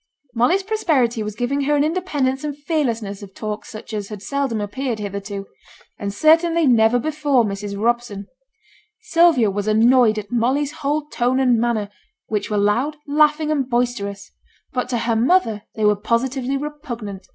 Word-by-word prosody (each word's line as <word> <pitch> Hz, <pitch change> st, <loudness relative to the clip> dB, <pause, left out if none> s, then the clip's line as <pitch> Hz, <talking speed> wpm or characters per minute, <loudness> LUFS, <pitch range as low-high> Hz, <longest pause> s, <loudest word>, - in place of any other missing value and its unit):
Molly's 250 Hz, +12 st, +2 dB
prosperity 295 Hz, -, +1 dB
was 210 Hz, -1 st, -4 dB
giving 245 Hz, +5 st, -1 dB
her 295 Hz, +1 st, +2 dB
an 285 Hz, -, +3 dB
independence 300 Hz, -6 st, -1 dB
and 290 Hz, -1 st, -4 dB
fearlessness 235 Hz, -, -2 dB
of 195 Hz, -1 st, -11 dB
talk 215 Hz, 0 st, -5 dB
such 220 Hz, +1 st, -9 dB
as 205 Hz, -2 st, -3 dB
had 210 Hz, -2 st, -8 dB
seldom 275 Hz, -1 st, -1 dB
appeared 235 Hz, +4 st, -3 dB
hitherto; 200 Hz, -1 st, -5 dB, 0.5 s
and 200 Hz, 0 st, -3 dB
certainly 330 Hz, -, +3 dB
never 235 Hz, -2 st, +4 dB
before 290 Hz, -1 st, +1 dB
Mrs. 200 Hz, 0 st, -4 dB
Robson. 235 Hz, -3 st, -1 dB, 0.8 s
Sylvia 325 Hz, -, +4 dB
was 205 Hz, +1 st, -3 dB
annoyed 225 Hz, +1 st, +4 dB
at 205 Hz, -1 st, -6 dB
Molly's 260 Hz, +5 st, +1 dB
whole 300 Hz, -1 st, -2 dB
tone 255 Hz, -2 st, 0 dB
and 250 Hz, -3 st, +3 dB
manner, 230 Hz, -3 st, 0 dB, 0.4 s
which 210 Hz, -1 st, -3 dB
were 210 Hz, -, 0 dB
loud, 235 Hz, +9 st, +1 dB
laughing, 300 Hz, +1 st, +3 dB
and 275 Hz, -4 st, 0 dB
boisterous; 205 Hz, -6 st, -2 dB, 0.4 s
but 250 Hz, -1 st, -2 dB
to 245 Hz, -, 0 dB
her 230 Hz, 0 st, 0 dB
mother 230 Hz, -, +2 dB
they 215 Hz, -, 0 dB
were 210 Hz, 0 st, +4 dB
positively 250 Hz, +5 st, -1 dB
repugnant. 250 Hz, -, -7 dB
240 Hz, 160 wpm, -21 LUFS, 210-290 Hz, 0.8 s, never